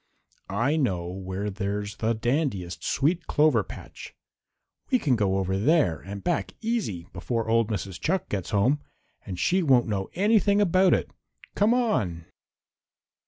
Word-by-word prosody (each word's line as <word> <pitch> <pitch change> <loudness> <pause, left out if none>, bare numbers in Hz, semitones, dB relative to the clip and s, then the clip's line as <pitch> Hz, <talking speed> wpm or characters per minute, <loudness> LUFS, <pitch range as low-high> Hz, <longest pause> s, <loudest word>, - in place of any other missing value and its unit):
I 120 +11 +1
know 95 - 0
where 95 +3 -4
there's 100 +1 -3
the 115 +1 0
dandiest 120 - -1
sweet 165 +5 0
clover 150 -7 +3
patch. - - -10 0.7
We 255 - +4
can 140 - +1
go 100 -3 +1
over 95 0 -1
there 130 - +3
and 100 +1 -8
back 175 - -1
easy 215 - -2
before 115 -2 -2
old 115 -1 +3
Mrs. 95 -3 -4
Chuck 185 +3 0
gets 95 -4 -3
home, 120 +9 +2 0.5
and 95 - -5
she 185 +2 +2
won't 130 -7 +4
know 100 -3 -2
anything 205 +1 +3
about 185 -1 +4
it. - - -3 0.4
Come 215 +4 +3
on!" 100 - 0
115 Hz, 145 wpm, -26 LUFS, -, 0.7 s, We